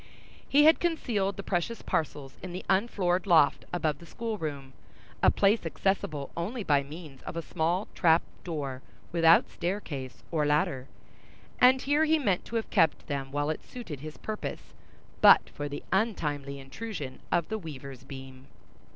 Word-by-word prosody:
He 290 +1 +6
had 315 +1 +7
concealed 225 - 0
the 195 - -5
precious 195 +5 -2
parcels 145 -3 -2
in 185 -1 -7
the 180 - -6
unfloored 190 -2 +1
loft 160 -6 +4
above 155 -4 -1
the 170 - -13
school 230 +2 -4
room, 140 -4 -5 0.5
a - - +7
place 205 +3 +3
accessible 165 -4 -1
only 210 +8 -3
by 145 -5 +3
means 145 -1 -10
of - - -7
a 165 - -2
small 170 +7 -1
trap 165 -1 +4 0.2
door 140 -6 -4 0.3
without 165 -1 +5
staircase 160 -8 -4
or 155 -3 +1
ladder; 145 -3 +1 0.7
and 255 +1 +6
here 290 +3 +3
he 320 +1 +4
meant 200 - 0
to 235 - -7
have 225 - -2
kept 160 -2 +3
them 135 -2 -3
while 145 +2 0
it 155 - -6
suited 205 - -8
his 155 +2 -8
purposes, 215 -1 -6 0.5
but - - +7
for 145 0 -5
the 145 - -6
untimely 150 -10 -1
intrusion 135 +1 -7
of 170 - +1
the 220 0 -2
weaver's 140 -6 -9
beam. 135 -1 -10
165 Hz, 160 wpm, -29 LUFS, 145-200 Hz, 0.7 s, had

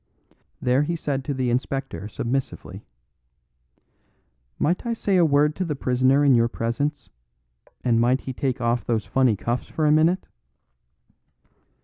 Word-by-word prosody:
There 125 +2 +2
he 165 +3 -1
said 140 -4 -3
to 145 - -2
the 130 -2 0
Inspector 130 -3 -3
submissively: 125 +4 -4 1.7
"Might 175 +4 0
I 235 - -1
say 200 -3 0
a 175 - +5
word 150 0 +3
to 185 - 0
the 160 -4 -3
prisoner 130 +2 +2
in 140 - +6
your 115 -1 +4
presence; 140 +6 -3 0.7
and 115 -2 +2
might 125 +3 +2
he 130 - -6
take 130 0 -2
off 120 0 0
those 115 -2 -1
funny 130 -4 +2
cuffs 120 +5 -3
for 155 - -2
a 150 - +4
minute?" 165 +4 +3
135 Hz, 145 wpm, -24 LUFS, 120-150 Hz, 1.7 s, in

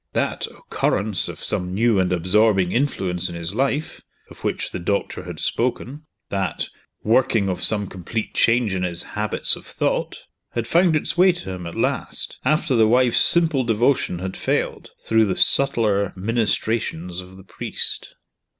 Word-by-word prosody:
That - - -1
"occurrence 105 -1 -1
of - - -9
some 90 0 -2
new 115 -1 +3
and 90 -1 +1
absorbing 95 +1 +2
influence 95 -9 -1
in 85 - -7
his 85 +2 -3
life," 135 +5 -1 0.3
of - - -14
which - - -2
the - - -4
doctor 100 +4 -2
had - - -7
spoken 130 +5 -2 0.2
that 95 -3 -2 0.3
"working 115 -2 +2
of 90 -2 -2
some 105 -2 +4
complete 95 +4 -5
change 115 -3 +2
in 95 - -2
his 90 -1 -1
habits 105 0 0
of - - -12
thought" - - -2 0.3
had 115 -1 -2
found 170 +5 +3
its 155 +3 -1
way 185 +1 +7
to 170 - -7
him 90 -2 -6
at 85 - -8
last, - - -1
after 155 -3 +2
the 110 -2 +5
wife's 125 +1 +4
simple 165 -6 +4
devotion 115 -3 +1
had 95 +1 -5
failed, - - -2 0.2
through 110 0 +3
the 95 -3 -1
subtler 105 -8 +3
ministrations 105 -4 -1
of 90 +1 -14
the 95 - -13
priest. - - -3
105 Hz, 160 wpm, -22 LUFS, 95-125 Hz, 0.3 s, way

